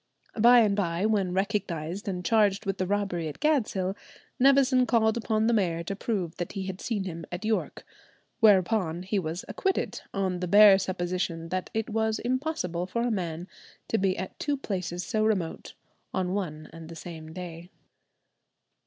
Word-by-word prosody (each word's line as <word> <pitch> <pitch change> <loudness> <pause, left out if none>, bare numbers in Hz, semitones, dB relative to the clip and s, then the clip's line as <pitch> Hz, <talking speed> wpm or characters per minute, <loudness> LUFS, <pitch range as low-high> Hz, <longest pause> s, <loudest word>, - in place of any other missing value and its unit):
By 240 +2 +8
and 205 -3 +3
by, 175 -1 0
when 205 -4 +1
recognized 190 -2 -2
and 180 -2 -3
charged 210 -2 +3
with 195 -1 -2
the 185 - 0
robbery 195 -5 -1
at 150 - -7
Gadshill, 210 -11 +1 0.4
Nevison 265 -1 +5
called 220 -2 +3
upon 220 -2 0
the 235 - +3
mayor 170 -6 +1
to 195 +3 -4
prove 190 -6 -3
that 175 - -4
he 195 - -3
had 190 0 -6
seen 215 -5 -2
him 170 -3 -6
at 175 +4 -5
York; 220 0 -2 0.5
whereupon 190 -5 +3
he 195 +2 0
was 165 +1 -4
acquitted, 385 -1 -1
"on 190 -2 -1
the 180 - -2
bare 205 +1 +8
supposition 175 -3 -2
that 185 0 -3
it 220 -1 0
was 220 0 0
impossible 245 - -2
for 235 +5 -1
a 240 - 0
man 175 -4 -3 0.4
to 225 - +1
be 190 -1 +1
at 190 - -6
two 290 -1 -1
places 180 -7 -4
so 215 +2 0
remote 195 -7 -1 0.4
on 185 -1 0
one 155 -6 -4
and 165 -1 -10
the 165 - -8
same 160 -1 -9
day." 175 0 -8
190 Hz, 170 wpm, -27 LUFS, 175-220 Hz, 0.5 s, By